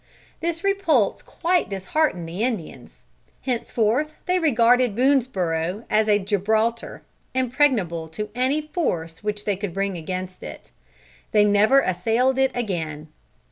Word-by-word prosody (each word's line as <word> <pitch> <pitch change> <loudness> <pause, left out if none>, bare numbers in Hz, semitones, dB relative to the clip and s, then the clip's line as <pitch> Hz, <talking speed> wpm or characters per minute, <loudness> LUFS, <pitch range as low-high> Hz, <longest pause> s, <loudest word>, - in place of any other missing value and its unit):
This 335 0 -3
repulse 360 - +2
quite 355 +1 0
disheartened 195 - -1
the 175 +5 -5
Indians. 225 -10 -5 0.4
Henceforth 250 +3 0
they 365 0 +2
regarded 245 - +3
Boonesborough 210 -8 0
as 215 0 +3
a 205 - +5
Gibraltar; 215 +3 -1 0.3
impregnable 240 - +1
to 210 +6 -6
any 260 +5 +1
force 180 - -3
which 210 0 -3
they 205 - +1
could 195 -2 -5
bring 195 -2 -1
against 185 +2 -5
it. - - -10 0.6
They 210 -1 +5
never 210 +6 +5
assailed 230 +8 +1
it 265 0 +4
again. 160 -10 -3
220 Hz, 125 wpm, -23 LUFS, 185-265 Hz, 0.6 s, a